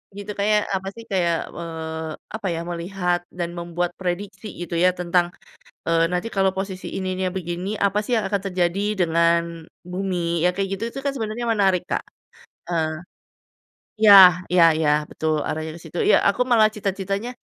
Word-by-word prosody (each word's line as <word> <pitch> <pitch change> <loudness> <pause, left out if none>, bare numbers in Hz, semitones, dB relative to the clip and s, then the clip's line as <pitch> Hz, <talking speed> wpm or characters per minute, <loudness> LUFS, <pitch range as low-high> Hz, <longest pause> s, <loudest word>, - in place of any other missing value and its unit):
Gitu 205 +1 -6
kayak, 210 +1 +2
apa 190 0 -2
sih 230 - -10
kayak, 170 -3 0
eee, 160 -1 -5 0.2
apa 210 -3 -4
ya, 165 -1 -2
melihat 175 +1 -1
dan 175 -1 -4
membuat 175 0 -3
prediksi 190 +3 -4
gitu 175 0 -6
ya, 180 +1 +5
tentang, 175 0 +1 0.6
eee, 165 0 +4
nanti 180 +6 -2
kalau 195 -1 +2
posisi 190 -1 -4
ininya 185 -1 -2
begini, 180 +3 -3
apa 200 +1 +1
sih 240 +3 -1
yang 215 - 0
akan 200 -2 +1
terjadi 190 +2 0
dengan 170 0 +1 0.2
bumi? 180 -2 -1
Yang 180 - +3
kayak 195 -1 -1
gitu 225 - -3
itu - - -5
kan 280 - +1
sebenernya 225 +2 -3
menarik, 195 -5 +2
Kak - - -1 0.6
heeh. 160 -2 -1 1.1
Iya 210 -2 +9 0.4
iya 180 -2 +5
iya 155 -2 +1 0.2
betul, 160 0 -1 0.2
arahnya 155 0 -3
ke - - -12
situ, 165 +2 -7
iya - - +7
aku 200 - 0
malah 220 -3 +5
cita-citanya, 200 +2 -3
180 Hz, 165 wpm, -23 LUFS, 170-200 Hz, 1.1 s, Iya